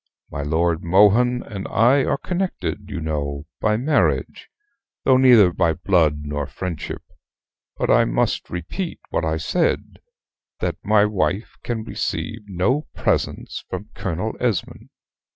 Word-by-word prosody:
My 70 - -4
Lord 80 +3 0
Mohun 105 +8 +4
and 100 -3 -6
I 125 +5 +4
are - - +1
connected, 105 - -3
you 95 -4 -4
know, 75 -2 -3
by 105 0 +2
marriage 145 +5 0 0.5
though 130 - +5
neither 120 -9 +6
by 85 -1 +2
blood 80 -4 +1
nor 75 -1 -3
friendship; 90 -5 -5 0.7
but - - +1
I - - +5
must - - 0
repeat 90 - -5
what - - 0
I 80 0 0
said, 165 - -1 0.6
that - - -2
my 105 0 +4
wife 105 +1 -1
can 115 -2 -3
receive 110 0 -3
no 100 - 0
presents - - -1
from - - -6
Colonel 90 +7 -3
Esmond." 115 -8 -2
95 Hz, 135 wpm, -22 LUFS, 80-120 Hz, 0.7 s, neither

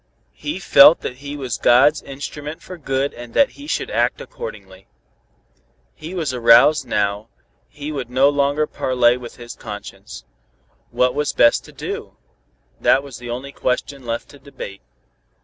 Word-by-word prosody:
He 295 - -5
felt 185 -3 +7
that 125 - -5
he 145 +2 -7
was 130 -5 -4
God's 140 +5 +5
instrument 145 +2 -7
for 185 - -9
good 135 -3 -2
and 120 -1 -11
that 280 - +4
he 285 - -12
should - - -2
act - - +1
accordingly. 485 +1 -9 1.1
He 165 +4 -9
was 155 -7 -2
aroused 120 +5 +5
now, 105 +2 -1 0.4
he 150 +1 -7
would 135 -5 -5
no 130 +2 +4
longer 145 +1 +1
parley 125 -4 +2
with 125 -2 -9
his 120 -1 -9
conscience. 105 -2 -9 0.6
What 125 0 +1
was 150 0 -1
best 115 - +4
to - - -13
do? - - -7 0.6
That 135 - +3
was 135 -4 -10
the 120 -1 -8
only 130 +4 -5
question 135 +1 -3
left 115 -1 -4
to 145 - -15
debate. 135 -8 -9
135 Hz, 155 wpm, -20 LUFS, 120-150 Hz, 1.1 s, felt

